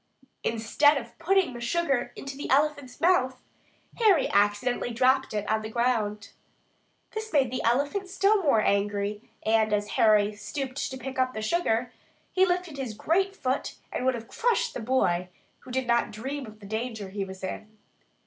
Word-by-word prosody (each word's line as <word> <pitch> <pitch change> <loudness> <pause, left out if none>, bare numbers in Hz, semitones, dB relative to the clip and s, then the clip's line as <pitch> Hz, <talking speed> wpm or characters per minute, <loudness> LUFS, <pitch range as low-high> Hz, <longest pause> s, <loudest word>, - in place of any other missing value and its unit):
Instead 230 +6 +3
of 235 -3 -7
putting 365 -3 +2
the 240 - -8
sugar 275 +1 0
into 275 0 -7
the 285 - -6
elephant's 285 -2 +1
mouth, 260 -7 +2 0.6
Harry 405 - +5
accidentally 205 +5 +1
dropped 260 +3 +2
it 210 -1 -3
on 220 0 +1
the 215 - -6
ground. 220 -3 0 0.8
This 440 0 -5
made 270 -6 +3
the 255 - -2
elephant 285 - +1
still 395 +2 +3
more 280 - +3
angry; 205 +1 0
and, 220 -1 +2
as 205 0 0
Harry 210 0 +4
stooped 260 +6 -4
to 260 - -6
pick 260 0 -6
up 255 0 +1
the 220 - -3
sugar, 245 -3 0 0.4
he 375 0 +4
lifted 355 -4 -1
his 245 -5 -4
great 385 - +1
foot 260 -6 -2 0.2
and - - -2
would 260 0 +2
have 230 -1 -8
crushed 480 0 0
the - - -4
boy, 200 -8 +1 0.3
who - - -15
did 260 +1 -1
not 235 0 +2
dream 265 +5 -5
of 215 0 -13
the - - -11
danger 220 -1 -4
he 200 +1 -3
was 190 0 -9
in. 215 +3 -6
250 Hz, 175 wpm, -27 LUFS, 215-290 Hz, 0.8 s, Harry